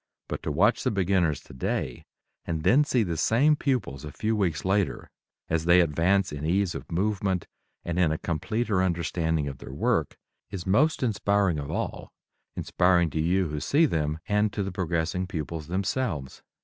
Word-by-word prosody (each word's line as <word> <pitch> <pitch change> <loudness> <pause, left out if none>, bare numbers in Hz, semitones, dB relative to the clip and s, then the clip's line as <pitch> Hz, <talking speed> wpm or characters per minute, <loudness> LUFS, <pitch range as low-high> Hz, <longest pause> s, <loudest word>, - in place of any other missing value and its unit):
But - - -4
to - - -3
watch 100 +10 +3
the - - +2
beginners 95 -6 +1
today, 65 - -4 0.4
and 80 -2 -3
then 140 - +5
see 130 -6 +1
the 85 -5 -3
same 130 - +3
pupils 125 - -2
a 75 - -7
few 110 +9 -1
weeks 90 -7 -1
later 95 0 0 0.4
as 80 0 -1
they 85 +1 +6
advance 90 +4 +2
in 75 0 -6
ease 90 +3 +1
of - - -8
movement 95 0 0 0.4
and 85 +1 -2
in 85 -4 +3
a 80 - -1
completer 105 +6 -1
understanding 80 -3 0
of 70 -1 -6
their - - -9
work, - - 0 0.3
is 90 -3 -6
most 135 +11 +2
inspiring 100 -6 +1
of 70 - -6
all - - -4 0.4
inspiring 90 -2 +2
to 80 - -1
you 90 +1 +1
who 75 0 -3
see 150 - +3
them 75 - -1
and 105 0 +2
to 100 - -1
the 95 - -4
progressing 90 0 -1
pupils 80 -2 -5
themselves. 95 - -2
90 Hz, 175 wpm, -27 LUFS, 80-100 Hz, 0.4 s, they